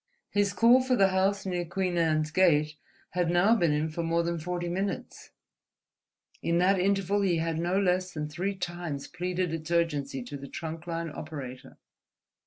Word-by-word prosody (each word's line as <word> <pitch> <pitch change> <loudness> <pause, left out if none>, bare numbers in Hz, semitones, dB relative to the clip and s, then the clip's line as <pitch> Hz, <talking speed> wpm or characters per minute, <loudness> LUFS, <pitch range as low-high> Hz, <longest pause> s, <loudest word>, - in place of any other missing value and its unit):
His 205 -1 +2
call 240 +4 +5
for 255 0 +1
the 195 -4 +4
house 195 +1 +1
near 180 -2 -1
Queen 180 +1 -2
Anne's 155 -2 +1
Gate 155 -4 +3 0.4
had 175 -1 0
now 175 +6 +4
been 170 -8 +2
in 150 +1 0
for 170 - -3
more 165 0 +1
than 170 0 -2
forty 175 +2 -3
minutes; 190 +3 -4 1.1
in 170 0 +1
that 185 +2 +3
interval 195 +1 +1
he 185 -4 +2
had 165 0 -1
no 175 +3 +1
less 185 -1 +1
than 150 -2 -4
three 180 +6 -3
times 175 -6 -4
pleaded 180 -1 -2
its 160 0 -5
urgency 145 -6 0
to 140 +4 -7
the 140 0 -9
trunk 165 +2 -6
line 165 -1 -3
operator. 140 -5 -8
175 Hz, 175 wpm, -28 LUFS, 160-190 Hz, 1.1 s, call